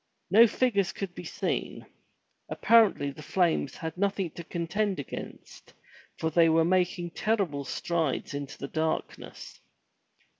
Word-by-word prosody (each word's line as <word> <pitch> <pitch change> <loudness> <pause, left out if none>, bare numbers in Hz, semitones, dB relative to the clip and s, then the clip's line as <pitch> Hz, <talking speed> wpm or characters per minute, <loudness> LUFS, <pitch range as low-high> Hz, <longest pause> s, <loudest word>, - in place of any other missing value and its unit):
No 225 +4 +8
figures 200 -5 +1
could 195 -3 -6
be - - -8
seen. - - -3 0.6
Apparently 220 -11 +4
the 145 - -11
flames 175 +1 0
had 160 -1 -5
nothing 195 -3 0
to 170 - -8
contend 185 +5 -2
against, 140 - -9 0.4
for 160 - -1
they 165 +1 +5
were 160 0 +4
making 175 -1 +1
terrible 180 -10 -1
strides 160 0 -2
into 140 -1 -6
the 140 - -5
darkness. 160 +2 -4
170 Hz, 125 wpm, -28 LUFS, 160-200 Hz, 0.6 s, No